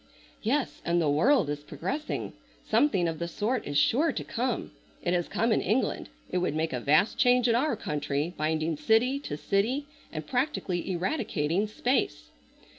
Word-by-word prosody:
"Yes, 260 +5 -1
and 170 0 +1
the 160 - +2
world 200 - +4
is 145 0 -3
progressing. 290 - -4 0.3
Something 195 -13 +3
of 165 -1 -3
the 170 - -2
sort 215 +8 -2
is 145 0 -1
sure 285 - +3
to - - -4
come. 245 0 -2 0.3
It 175 - +1
has 175 -1 0
come 230 +1 0
in - - +3
England. 220 +8 0 0.2
It - - +1
would 175 -4 -1
make 160 -1 -1
a 125 - -1
vast 155 - +3
change 250 0 +4
in 235 - +4
our 255 +3 +2
country, 150 -4 -2
binding 155 +1 -1
city 245 - +3
to 215 - -5
city 225 - 0 0.3
and 155 -1 -5
practically 245 - -1
eradicating 185 - 0
space." 210 - -1
190 Hz, 170 wpm, -28 LUFS, 155-250 Hz, 0.3 s, world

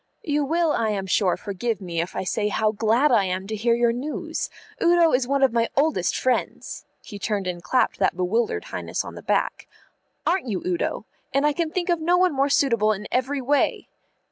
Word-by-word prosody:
"You 295 -3 0
will, 325 +3 +1
I 225 -6 0
am 200 -2 -2
sure, 190 -1 +2
forgive 210 +2 -3
me 170 -4 -3
if 170 - -6
I - - -2
say 210 +3 -1
how 215 +1 +1
glad 225 +7 +2
I 215 -5 +4
am 185 +1 -2
to 215 +2 -4
hear 230 +2 +2
your 235 0 +2
news. 275 +6 -4 0.3
Udo 340 -1 +4
is 250 -1 +2
one 275 0 +1
of 260 -3 +4
my 230 -1 +1
oldest 280 - +1
friends" 255 -1 -2 0.2
he 205 -3 -9
turned 205 -2 -2
and 180 -1 -4
clapped 210 +10 +1
that - - +1
bewildered 225 - 0
Highness - - -4
on - - -8
the - - -9
back - - -1 0.6
"aren't 360 -6 +1
you, 200 -5 -3
Udo? 180 +3 -2 0.3
and 275 +1 +3
I 295 - +3
can 330 +1 -1
think 355 +2 -3
of 345 -1 +2
no 350 +3 +3
one 365 -2 +3
more 275 +1 +1
suitable 230 -7 +3
in 210 +1 -7
every 265 +2 0
way." 280 +3 0
235 Hz, 210 wpm, -24 LUFS, 205-290 Hz, 0.6 s, I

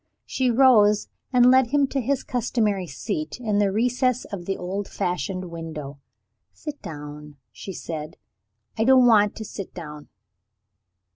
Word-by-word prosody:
She 260 -1 0
rose, 225 -5 +5 0.2
and 250 -1 +6
led 260 -1 +5
him 285 +3 +2
to 275 - -1
his 270 +2 -1
customary 215 -6 -1
seat 155 - -4
in 215 -4 0
the 200 -1 +2
recess 250 +3 +1
of 185 -4 -6
the 195 - -1
old 190 +3 -4
fashioned 180 0 -3
window. 155 -4 -7 0.5
"Sit 300 -2 -8
down," 150 -1 -9 0.2
she 115 - -8
said. 155 -3 -6 0.6
"I - - +4
don't 260 +1 +6
want 210 -4 +5
to 220 - -6
sit 195 -2 -8
down." 150 -4 -9
205 Hz, 145 wpm, -24 LUFS, 165-250 Hz, 0.6 s, and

